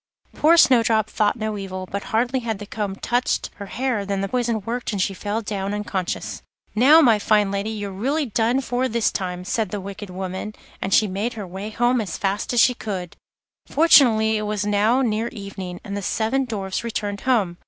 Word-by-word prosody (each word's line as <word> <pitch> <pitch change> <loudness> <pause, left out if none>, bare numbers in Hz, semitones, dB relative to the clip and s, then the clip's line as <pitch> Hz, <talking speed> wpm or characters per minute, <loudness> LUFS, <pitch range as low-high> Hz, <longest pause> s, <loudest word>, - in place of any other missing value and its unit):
Poor 330 +3 +4
Snowdrop 225 -7 +4
thought 210 -1 +1
no 215 -2 -3
evil, 185 -1 -5
but 200 +2 -5
hardly 245 +4 0
had 225 -3 -3
the 205 - -8
comb 205 -2 -4
touched 245 +5 -1
her 200 -2 -7
hair 245 -2 -1
than 200 -1 -2
the 195 - -1
poison 235 -1 -1
worked 240 +5 -3
and 205 - -3
she 190 +1 0
fell 210 +4 -3
down 200 -1 -3
unconscious. 195 -3 -3 0.3
'Now, 280 +9 +7
my 230 -7 +5
fine 210 -1 +2
lady, 200 +2 -2
you're 205 -2 -4
really 275 +11 -1
done 235 +3 +1
for 250 0 -1
this 235 -2 +1
time,' 180 -1 -4
said 215 +1 -1
the 205 - -4
wicked 200 +1 -8
woman, 190 +3 -5 0.3
and 190 - -2
she 215 - +5
made 205 +5 -2
her 210 -3 -6
way 190 +4 -6
home 240 +2 +1
as 195 -6 -4
fast 200 +1 -1
as 245 - +2
she 250 - +6
could. 190 -7 -5 0.5
Fortunately 230 -9 +5
it - - -2
was 210 -1 -1
now 210 +5 +2
near 225 -1 0
evening, 195 -5 -7
and 200 - -5
the 200 - -3
seven 225 +7 0
Dwarfs 195 -5 -3
returned 205 -3 -3
home. 210 -10 +1
215 Hz, 200 wpm, -22 LUFS, 195-235 Hz, 0.5 s, Now